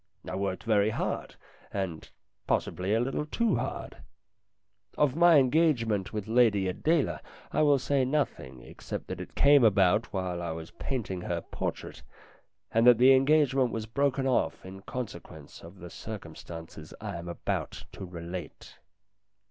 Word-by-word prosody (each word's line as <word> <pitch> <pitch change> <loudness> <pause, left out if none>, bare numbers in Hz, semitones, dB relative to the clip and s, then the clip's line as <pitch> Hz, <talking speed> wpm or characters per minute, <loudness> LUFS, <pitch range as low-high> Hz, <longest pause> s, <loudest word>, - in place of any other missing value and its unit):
I - - -5
worked 95 -1 -2
very 105 -2 +3
hard, - - -3 0.4
and, 95 -5 -4 0.4
possibly, 95 +4 0
a - - +2
little 135 +5 -2
too 230 +5 +1
hard. - - -5 1.0
Of 145 -3 +2
my 170 -1 +6
engagement 125 - +2
with 105 -2 -4
Lady 110 -5 +3
Adela 150 - 0 0.3
I - - +1
will 145 -2 +5
say 135 +1 +1
nothing, 125 - -2
except - - -7
that - - -5
it - - -10
came 140 -2 +6
about 100 0 +3
while 90 -3 -3
I 85 -2 -3
was 80 0 -8
painting 110 -9 -4
her 85 -1 -3
portrait, - - -5 0.7
and 115 +2 +3
that 120 -2 +8
the 130 +3 +7
engagement 135 -1 +3
was 110 -1 -3
broken 135 +3 0
off 85 -12 0
in 95 +1 -9
consequence 90 - -8
of 85 +4 -13
the 90 -1 -10
circumstances 85 -5 -9
I 105 -4 -5
am 85 +1 -8
about 85 - -4
to - - -9
relate. 90 -1 -8
110 Hz, 150 wpm, -29 LUFS, 90-135 Hz, 1.0 s, that